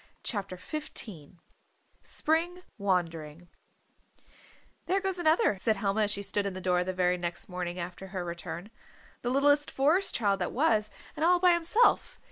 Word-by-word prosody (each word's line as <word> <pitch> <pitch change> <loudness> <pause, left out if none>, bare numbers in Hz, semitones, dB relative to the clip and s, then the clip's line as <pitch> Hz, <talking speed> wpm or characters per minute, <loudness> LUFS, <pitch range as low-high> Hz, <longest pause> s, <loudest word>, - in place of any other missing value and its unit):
CHAPTER 195 -5 -2
XV 185 - -6 0.6
SPRING 345 +3 -1 0.2
WANDERING 170 -4 -2 1.4
"There 385 +2 +2
goes 385 -2 -1
another," 315 - +3
said 220 +3 +2
Helma 200 +1 +1
as - - -3
she 200 0 -3
stood 200 0 -1
in 195 - -4
the - - -4
door 180 -1 +1
the 185 - -2
very 180 -1 +1
next 175 0 -5
morning 180 -1 -4
after 180 +2 -6
her 185 -2 -4
return. 170 +3 -6 0.5
"The 245 - -1
littlest 285 +3 +3
Forest 315 +8 +2
Child 200 -3 +1
that 180 - -2
was, 220 -7 +2 0.3
and 305 - -3
all 355 +1 +5
by 360 -1 +6
himself. 345 +8 +2
200 Hz, 155 wpm, -29 LUFS, -, 1.4 s, by